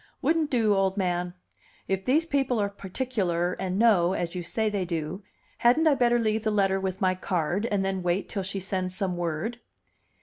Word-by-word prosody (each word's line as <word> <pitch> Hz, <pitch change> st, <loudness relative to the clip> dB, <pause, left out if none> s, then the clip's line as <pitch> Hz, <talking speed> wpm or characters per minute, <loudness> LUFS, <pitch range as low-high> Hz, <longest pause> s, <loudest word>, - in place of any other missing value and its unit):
"Wouldn't 320 Hz, -2 st, +1 dB
do, 225 Hz, -5 st, +3 dB
old 195 Hz, 0 st, +1 dB
man. 180 Hz, -2 st, -1 dB, 0.5 s
If 190 Hz, 0 st, -1 dB
these 300 Hz, +6 st, +3 dB
people 270 Hz, -6 st, 0 dB
are 200 Hz, -1 st, +1 dB
particular 190 Hz, -4 st, -2 dB
and 185 Hz, 0 st, -2 dB
know, 195 Hz, -6 st, +4 dB
as 175 Hz, -3 st, -2 dB
you 180 Hz, -, -3 dB
say 220 Hz, +6 st, -1 dB
they 205 Hz, -3 st, -1 dB
do, 170 Hz, +1 st, -4 dB, 0.4 s
hadn't 250 Hz, +7 st, +4 dB
I 310 Hz, -, +6 dB
better 240 Hz, -3 st, +3 dB
leave 220 Hz, -1 st, 0 dB
the 220 Hz, -, +1 dB
letter 195 Hz, -2 st, +2 dB
with 190 Hz, 0 st, -3 dB
my 185 Hz, -1 st, +3 dB
card, 185 Hz, +3 st, -1 dB
and 200 Hz, -3 st, 0 dB
then 190 Hz, -1 st, -1 dB
wait 175 Hz, +2 st, 0 dB
till 200 Hz, -, -3 dB
she 195 Hz, +1 st, -4 dB
sends 185 Hz, -1 st, -2 dB
some 190 Hz, -3 st, -1 dB
word?" 175 Hz, +8 st, -3 dB
195 Hz, 195 wpm, -27 LUFS, 180-225 Hz, 0.5 s, I